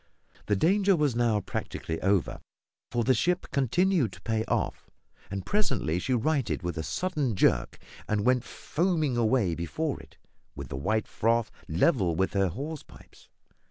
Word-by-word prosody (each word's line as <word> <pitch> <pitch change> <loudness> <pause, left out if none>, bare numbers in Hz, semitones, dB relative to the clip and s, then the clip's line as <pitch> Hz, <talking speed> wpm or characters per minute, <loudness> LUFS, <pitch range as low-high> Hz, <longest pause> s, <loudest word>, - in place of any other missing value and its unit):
The 105 - +3
danger 195 - +3
was 150 -6 +1
now 115 -3 +2
practically 80 -3 -4
over, 95 -1 +1 0.5
for 120 -1 0
the 130 - +4
ship 175 +9 +1
continued 145 - +2
to 90 - -13
pay 110 +1 0
off, - - -2 0.4
and 95 -1 -4
presently 125 - 0
she 130 +7 0
righted 130 - 0
with 90 0 -2
a - - 0
sudden 150 - -1
jerk, 60 -9 +2 0.3
and 105 -1 0
went 125 -1 +3
foaming 160 -5 -1
away 115 -5 +2
before 135 - -2
it, - - -16 0.4
with - - -7
the - - -5
white 110 +10 0
froth 115 +1 +1 0.2
level 90 - +2
with 95 +3 0
her 100 -1 +2
hawse 145 - -5
pipes. - - -18
120 Hz, 160 wpm, -28 LUFS, 95-150 Hz, 0.5 s, the